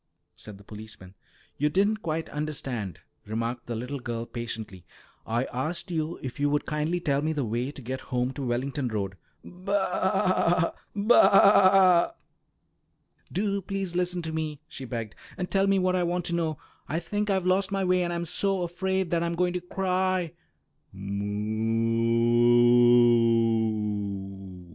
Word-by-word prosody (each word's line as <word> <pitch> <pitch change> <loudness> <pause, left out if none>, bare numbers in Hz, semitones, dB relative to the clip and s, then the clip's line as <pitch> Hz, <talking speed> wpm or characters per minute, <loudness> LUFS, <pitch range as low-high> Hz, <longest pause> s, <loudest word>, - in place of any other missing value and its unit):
"Miaow!" - - -52
said 105 -2 -11
the 100 - -16
policeman. 105 -3 -11 0.5
"You 150 +2 +2
didn't 205 +6 +1
quite 160 -2 -3
understand," 135 - -4 0.3
remarked 115 +3 -3
the 120 - -3
little 125 +5 -5
girl 120 -1 -4
patiently. 115 -6 -6 0.4
"I 115 +2 0
asked 155 +8 -3
you 160 0 -2
if 130 +1 -6
you 145 0 +2
would 145 0 0
kindly 155 +3 -1
tell 140 -4 0
me 155 +1 -1
the 145 -4 -2
way 120 +4 -2
to 140 - -10
get 130 +3 -4
home 125 0 -1
to 140 - -6
Wellington 130 +3 -2
Road." 100 -4 -3 0.3
"Ba, 185 -2 0 0.2
ba!" 195 -4 +5 1.2
"Do 200 +1 -1
please 195 -1 -4
listen 180 -1 0
to 160 0 -4
me," 155 -2 -3
she 135 - -8
begged, 115 -4 -5 0.2
"and 180 -1 -4
tell 195 0 +2
me 195 0 +3
what 185 -1 +1
I 180 - +1
want 175 0 -1
to 170 - -1
know. 160 -3 -1 0.3
I 160 - -1
think 205 +4 -3
I've 190 -2 +1
lost 190 +1 +1
my 195 -1 0
way, 180 0 +2
and 175 -1 -1
I'm 170 0 -2
so 195 +2 0
afraid 190 +1 -2
that 170 -1 +1
I'm 170 0 -1
going 180 +1 +1
to 180 - -3
cry." 185 -1 -1
170 Hz, 150 wpm, -27 LUFS, 130-185 Hz, 1.2 s, ba